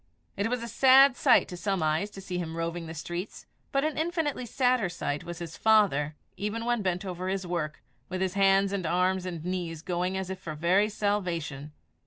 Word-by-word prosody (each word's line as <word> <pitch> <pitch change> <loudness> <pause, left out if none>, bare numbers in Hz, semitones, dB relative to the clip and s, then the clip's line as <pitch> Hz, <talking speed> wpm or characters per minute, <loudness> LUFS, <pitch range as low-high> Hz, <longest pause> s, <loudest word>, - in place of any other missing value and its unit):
It 200 +3 -1
was 245 -1 -2
a - - -4
sad 265 +3 +6
sight 255 -1 +4
to 180 - -6
some 190 -1 -1
eyes 155 +6 +1
to 195 - -10
see 180 -2 -4
him 165 -1 -4
roving 165 0 -3
the 160 - -7
streets, 175 +5 -6 0.3
but 275 0 +1
an 310 0 -1
infinitely 315 -6 -1
sadder 250 -4 +2
sight 145 -4 -3
was 175 -1 -7
his 170 -2 -7
father, 190 -10 +3 0.2
even 210 +4 -3
when 240 -2 +1
bent 185 0 -1
over 185 0 -4
his 190 0 -2
work, 170 -3 -3 0.3
with 185 0 -3
his 190 -1 0
hands 195 0 +3
and 185 -4 -1
arms 185 +2 +1
and 170 -3 -6
knees 175 -3 -3
going 180 +1 -1
as 190 -1 -3
if 190 - -5
for 155 -2 -6
very 185 +7 +3
salvation. 175 -9 -2
185 Hz, 205 wpm, -28 LUFS, 170-210 Hz, 0.3 s, sad